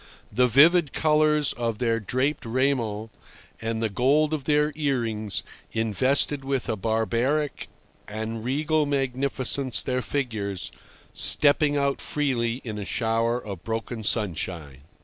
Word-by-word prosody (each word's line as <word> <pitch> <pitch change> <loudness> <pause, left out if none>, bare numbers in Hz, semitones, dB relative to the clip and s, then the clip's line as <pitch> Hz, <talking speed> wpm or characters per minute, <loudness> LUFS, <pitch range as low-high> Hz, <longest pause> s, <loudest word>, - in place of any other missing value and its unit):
The 125 0 +3
vivid 150 +5 +4
colours 150 -2 +2
of 115 -2 -3
their 115 -1 0
draped 130 +7 -1
raiment 115 -3 -1 0.5
and 115 0 -3
the 110 - 0
gold 145 +8 +2
of 145 -4 -3
their 150 0 +2
earrings 115 -8 -2 0.3
invested 130 +6 +1
with 135 -2 -2
a 115 - -1
barbaric 115 +8 -1 0.4
and 110 +1 -5
regal 150 +4 0
magnificence 135 -1 +1
their 130 -1 -1
figures, 110 -10 -3 0.4
stepping 145 0 +4
out 140 -1 0
freely 125 -4 -1
in 110 -3 -6
a - - -4
shower 115 +2 0
of 100 -5 -7
broken 115 0 -4
sunshine. 85 - 0
125 Hz, 125 wpm, -25 LUFS, 110-140 Hz, 0.5 s, vivid